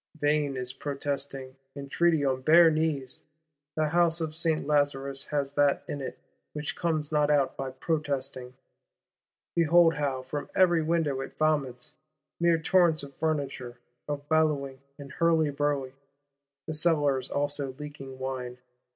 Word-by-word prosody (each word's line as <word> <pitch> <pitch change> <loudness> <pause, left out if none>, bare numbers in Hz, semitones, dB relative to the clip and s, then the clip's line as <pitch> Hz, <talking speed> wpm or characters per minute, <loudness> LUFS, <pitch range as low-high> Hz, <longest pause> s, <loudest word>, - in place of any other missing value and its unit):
Vain 145 -2 +1
is 125 0 -2
protesting, 140 -2 -4 0.2
entreaty 145 +2 +1
on 130 -1 0
bare 165 +4 +7
knees: 155 -5 -2 0.5
the 155 -1 +1
House 170 0 +2
of 155 -2 -3
Saint 160 -3 0
Lazarus 140 -2 0
has 140 -2 -2
that 145 -1 +2
in 145 - -4
it 130 - -6 0.4
which 150 0 -4
comes 155 -3 -1
not 150 -1 +2
out 145 -3 +2
by 135 -1 -4
protesting. 135 -2 -3 1.0
Behold, 170 0 +5
how, 140 -4 -2
from 145 +3 -5
every 175 -3 +4
window, 155 -4 0
it - - -8
vomits: 145 -3 -1 0.5
mere 170 -1 +4
torrents 160 -2 +3
of 140 -1 -10
furniture, 140 -6 -2 0.3
of 145 -1 -4
bellowing 145 -4 +1 0.2
and 140 -2 -10
hurlyburly;—the 140 -2 -2
cellars 145 -5 +1
also 145 -2 -2
leaking 145 -3 -9
wine. 130 -2 -5
145 Hz, 130 wpm, -28 LUFS, 135-155 Hz, 1.0 s, bare